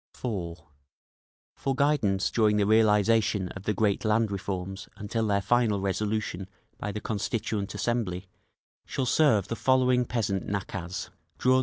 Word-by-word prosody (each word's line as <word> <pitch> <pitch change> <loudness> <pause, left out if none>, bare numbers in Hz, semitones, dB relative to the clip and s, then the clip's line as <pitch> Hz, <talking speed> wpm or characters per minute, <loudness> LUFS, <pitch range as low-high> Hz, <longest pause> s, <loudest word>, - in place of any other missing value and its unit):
(4.) 95 -9 -3 1.0
For 135 -1 -2
guidance 130 -9 +2
during 105 -2 +3
the 105 - +3
realisation 105 -2 +3
of 100 0 -9
the 105 - +1
great 105 -1 +1
land 110 0 +2
reforms 95 -1 -4
until 110 +2 -2
their 100 -1 +1
final 110 -1 +2
resolution 100 -1 -2 0.3
by 105 - -3
the 105 - -4
Constituent 105 -1 -2
Assembly, 100 -6 -1 0.6
shall 135 - -1
serve 120 - +3
the 115 - -3
following 125 0 +3
peasant 105 -6 -1
nakaz 95 -3 -4 0.3
(See 125 - +2
App. - - +6
105 Hz, 140 wpm, -28 LUFS, 100-115 Hz, 1.0 s, App